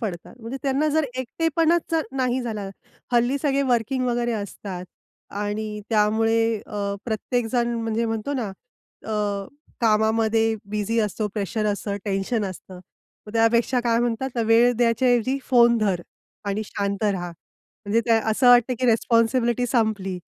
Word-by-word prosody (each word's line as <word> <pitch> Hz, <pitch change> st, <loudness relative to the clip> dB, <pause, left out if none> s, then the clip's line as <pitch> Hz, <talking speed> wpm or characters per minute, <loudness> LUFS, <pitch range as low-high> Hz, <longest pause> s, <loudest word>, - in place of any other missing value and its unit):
पडतात. 180 Hz, -5 st, -5 dB
म्हणजे 230 Hz, +4 st, -6 dB
त्यांना 275 Hz, +2 st, +1 dB
जर 310 Hz, +1 st, +2 dB
एकटेपणाच 325 Hz, +6 st, 0 dB, 0.2 s
नाही 260 Hz, -1 st, 0 dB
झाला, 215 Hz, -4 st, -4 dB, 0.4 s
हल्ली 240 Hz, +3 st, +3 dB
सगळे 280 Hz, -1 st, +2 dB
वर्किंग 255 Hz, 0 st, 0 dB
वगैरे 240 Hz, -1 st, 0 dB
असतात 200 Hz, -3 st, -5 dB, 0.5 s
आणि 210 Hz, +1 st, -3 dB
त्यामुळे 225 Hz, +1 st, +2 dB
अ, 200 Hz, -1 st, -3 dB
प्रत्येक 235 Hz, +1 st, -1 dB
जण 240 Hz, -1 st, +1 dB
म्हणजे 225 Hz, 0 st, -1 dB
म्हणतो 225 Hz, +4 st, -2 dB
ना 240 Hz, -6 st, -2 dB, 0.6 s
अ, 205 Hz, -2 st, -2 dB, 0.3 s
कामामध्ये 225 Hz, 0 st, +2 dB, 0.2 s
बिझी 210 Hz, +2 st, -1 dB
असतो 210 Hz, 0 st, -1 dB
प्रेशर 215 Hz, +1 st, -2 dB
असतं, 205 Hz, 0 st, -2 dB
टेन्शन 205 Hz, +2 st, -1 dB
असतं. 190 Hz, 0 st, -8 dB, 0.5 s
मग 210 Hz, -, -9 dB
त्यापेक्षा 230 Hz, +2 st, +3 dB
काय 230 Hz, -1 st, +2 dB
म्हणतात 240 Hz, +2 st, -2 dB
वेळ 230 Hz, +2 st, +5 dB
द्यायच्या 240 Hz, +2 st, +2 dB
ऐवजी 245 Hz, +2 st, +2 dB
फोन 235 Hz, -2 st, +5 dB
धर 195 Hz, -5 st, 0 dB, 0.5 s
आणि 200 Hz, +2 st, -1 dB
शांत 200 Hz, 0 st, -3 dB
रहा. 190 Hz, -4 st, 0 dB
म्हणजे 205 Hz, +5 st, -5 dB
त्या 230 Hz, -1 st, +4 dB
असं 245 Hz, +3 st, +3 dB
वाटत, 245 Hz, 0 st, +6 dB
की 255 Hz, -, +2 dB
रिस्पॉन्सिबिलिटी 235 Hz, +1 st, +2 dB
संपली. 215 Hz, -6 st, 0 dB
225 Hz, 140 wpm, -23 LUFS, 210-245 Hz, 0.6 s, वाटत